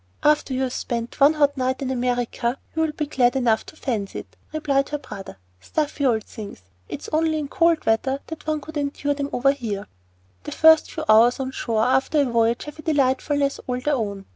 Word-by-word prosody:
"After 295 Hz, -3 st, +2 dB
you've 260 Hz, -1 st, -1 dB
spent 235 Hz, 0 st, -4 dB
one 285 Hz, +3 st, +6 dB
hot 285 Hz, -2 st, +3 dB
night 260 Hz, 0 st, 0 dB
in 260 Hz, -, -2 dB
America 245 Hz, 0 st, -1 dB, 0.2 s
you'll 320 Hz, -1 st, 0 dB
be 300 Hz, 0 st, -3 dB
glad 250 Hz, -4 st, +2 dB
enough 235 Hz, -4 st, +2 dB
to -, -, -12 dB
fancy 225 Hz, -10 st, -3 dB
it," -, -, -22 dB, 0.2 s
replied 280 Hz, -3 st, 0 dB
her 295 Hz, -, -2 dB
brother. 210 Hz, -, -9 dB, 0.2 s
"Stuffy 290 Hz, -, -1 dB
old 220 Hz, -3 st, +1 dB
things. 205 Hz, -, -10 dB, 0.3 s
It's -, -, -6 dB
only 315 Hz, 0 st, +2 dB
in 300 Hz, -2 st, -3 dB
cold 335 Hz, +2 st, +2 dB
weather 265 Hz, +5 st, +1 dB
that 320 Hz, -1 st, -9 dB
one 310 Hz, -1 st, 0 dB
could 315 Hz, +1 st, -8 dB
endure 285 Hz, 0 st, -1 dB
them 280 Hz, 0 st, -3 dB
over 275 Hz, +3 st, +3 dB
here." 215 Hz, -7 st, -4 dB, 0.6 s
The -, -, -6 dB
first 320 Hz, 0 st, +6 dB
few 315 Hz, -, -5 dB
hours 230 Hz, +4 st, +5 dB
on 265 Hz, 0 st, -3 dB
shore 225 Hz, -4 st, -1 dB
after 260 Hz, +5 st, +2 dB
a -, -, +2 dB
voyage 235 Hz, -1 st, +1 dB
have 295 Hz, +1 st, -10 dB
a -, -, -6 dB
delightfulness 280 Hz, -1 st, +1 dB
all 250 Hz, -1 st, -1 dB
their 295 Hz, +4 st, 0 dB
own. 200 Hz, -6 st, -3 dB
265 Hz, 200 wpm, -23 LUFS, 240-295 Hz, 0.6 s, one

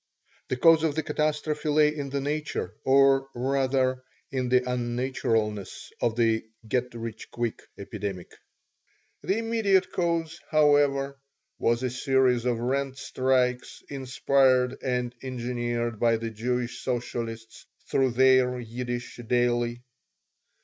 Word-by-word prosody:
The 130 Hz, -, -2 dB
cause 165 Hz, +3 st, +6 dB
of 160 Hz, -3 st, 0 dB
the 160 Hz, -, -1 dB
catastrophe 150 Hz, 0 st, -1 dB
lay 150 Hz, 0 st, +4 dB
in 140 Hz, -2 st, -4 dB
the 140 Hz, 0 st, -2 dB
nature, 145 Hz, -9 st, -3 dB
or 135 Hz, 0 st, +4 dB
rather 130 Hz, 0 st, +1 dB, 0.3 s
in 130 Hz, -2 st, -1 dB
the 125 Hz, 0 st, +3 dB
unnaturalness, 120 Hz, -4 st, -2 dB
of 115 Hz, -2 st, +1 dB
the 115 Hz, -1 st, +2 dB, 0.2 s
"get 125 Hz, +2 st, 0 dB
rich 115 Hz, -1 st, -7 dB
quick" 120 Hz, -2 st, -3 dB, 0.2 s
epidemic. 100 Hz, -3 st, -6 dB, 0.9 s
Its -, -, -2 dB
immediate 220 Hz, -4 st, +1 dB
cause, 170 Hz, -1 st, -1 dB
however, 145 Hz, -2 st, +3 dB, 0.4 s
was 120 Hz, +2 st, +1 dB
a 130 Hz, -, -1 dB
series 130 Hz, -2 st, +2 dB
of 120 Hz, -2 st, +1 dB
rent 135 Hz, +3 st, -1 dB
strikes 130 Hz, -2 st, 0 dB
inspired 130 Hz, -1 st, +2 dB
and 125 Hz, -2 st, -1 dB
engineered 120 Hz, -3 st, -3 dB
by 115 Hz, -1 st, +3 dB
the 115 Hz, 0 st, -4 dB
Jewish 120 Hz, +2 st, -2 dB
socialists 115 Hz, -2 st, -4 dB, 0.2 s
through 130 Hz, -2 st, +1 dB
their 130 Hz, 0 st, +4 dB
Yiddish 120 Hz, +1 st, -5 dB
daily. 120 Hz, 0 st, +1 dB
125 Hz, 120 wpm, -27 LUFS, 120-140 Hz, 0.9 s, cause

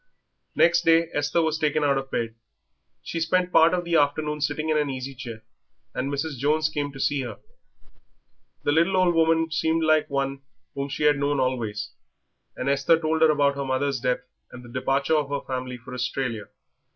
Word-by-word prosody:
Next 175 Hz, 0 st, +4 dB
day 165 Hz, 0 st, +4 dB
Esther 145 Hz, +3 st, +1 dB
was 160 Hz, 0 st, 0 dB
taken 150 Hz, -1 st, +1 dB
out 140 Hz, -1 st, +3 dB
of 135 Hz, 0 st, -3 dB
bed. 115 Hz, -3 st, -2 dB, 0.7 s
She 165 Hz, -, -4 dB
spent 180 Hz, +2 st, +1 dB
part 165 Hz, 0 st, +6 dB
of 180 Hz, -1 st, 0 dB
the 170 Hz, -1 st, +2 dB
afternoon 150 Hz, +1 st, 0 dB
sitting 150 Hz, +2 st, -1 dB
in 155 Hz, -, +2 dB
an 145 Hz, -1 st, 0 dB
easy 135 Hz, 0 st, -5 dB
chair, 120 Hz, -4 st, -8 dB, 0.5 s
and 135 Hz, +2 st, -2 dB
Mrs. 140 Hz, -1 st, -3 dB
Jones 155 Hz, +3 st, +2 dB
came 145 Hz, -2 st, -3 dB
to 135 Hz, -, -10 dB
see 140 Hz, +1 st, +1 dB
her. 120 Hz, -5 st, -6 dB, 1.3 s
The -, -, +1 dB
little 170 Hz, +5 st, +3 dB
old 180 Hz, -2 st, +3 dB
woman 165 Hz, 0 st, +2 dB
seemed 160 Hz, 0 st, +1 dB
like 155 Hz, -1 st, +3 dB
one 135 Hz, -1 st, -2 dB, 0.3 s
whom 140 Hz, 0 st, -4 dB
she 140 Hz, -, -3 dB
had 150 Hz, -1 st, +4 dB
known 145 Hz, 0 st, 0 dB
always, 115 Hz, -6 st, -2 dB, 0.6 s
and 130 Hz, -, -4 dB
Esther 140 Hz, +4 st, +3 dB
told 160 Hz, 0 st, -1 dB
her 160 Hz, -, +6 dB
about 145 Hz, -2 st, +3 dB
her 140 Hz, 0 st, -4 dB
mother's 135 Hz, 0 st, -1 dB
death 125 Hz, +1 st, 0 dB, 0.3 s
and 125 Hz, -, -10 dB
the -, -, -12 dB
departure 135 Hz, +4 st, 0 dB
of 150 Hz, -2 st, 0 dB
her 140 Hz, 0 st, -2 dB
family 125 Hz, -1 st, -5 dB
for 125 Hz, +1 st, -11 dB
Australia. 125 Hz, -3 st, -3 dB
145 Hz, 190 wpm, -25 LUFS, 135-160 Hz, 1.3 s, part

